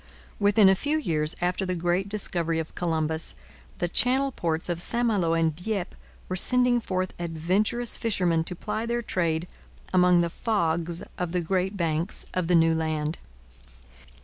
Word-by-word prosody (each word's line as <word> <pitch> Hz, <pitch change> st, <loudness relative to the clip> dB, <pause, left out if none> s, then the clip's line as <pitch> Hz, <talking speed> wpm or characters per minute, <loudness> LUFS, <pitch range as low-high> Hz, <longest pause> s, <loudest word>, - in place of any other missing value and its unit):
Within 205 Hz, 0 st, +5 dB
a 190 Hz, -, +6 dB
few 290 Hz, +11 st, 0 dB
years 155 Hz, -, +1 dB
after 180 Hz, +2 st, 0 dB
the 185 Hz, -1 st, -2 dB
great 175 Hz, +3 st, -1 dB
discovery 170 Hz, -5 st, 0 dB
of 160 Hz, -1 st, -4 dB
Columbus, 160 Hz, -2 st, -1 dB, 0.4 s
the 175 Hz, -, -1 dB
Channel 260 Hz, +9 st, +2 dB
ports 165 Hz, -7 st, -2 dB
of 175 Hz, -1 st, +3 dB
St 240 Hz, +6 st, +1 dB
Malo 185 Hz, -8 st, +1 dB
and 165 Hz, -2 st, +1 dB
Dieppe 190 Hz, +1 st, -3 dB, 0.3 s
were 185 Hz, -, -3 dB
sending 250 Hz, +5 st, +5 dB
forth 185 Hz, -4 st, -3 dB
adventurous 185 Hz, +8 st, 0 dB
fishermen 180 Hz, -7 st, +1 dB
to 180 Hz, -, -4 dB
ply 215 Hz, +5 st, -4 dB
their 235 Hz, 0 st, -1 dB
trade 170 Hz, -4 st, -1 dB, 0.5 s
among 180 Hz, -1 st, +5 dB
the 170 Hz, -1 st, -1 dB
fogs 170 Hz, -6 st, -1 dB, 0.2 s
of 180 Hz, -1 st, -3 dB
the 180 Hz, -, +1 dB
Great 190 Hz, +3 st, -1 dB
Banks 165 Hz, +1 st, -2 dB
of 180 Hz, -2 st, -1 dB
the 180 Hz, -, +3 dB
New 165 Hz, 0 st, +4 dB
Land. 155 Hz, 0 st, -2 dB
180 Hz, 160 wpm, -26 LUFS, 165-205 Hz, 0.5 s, a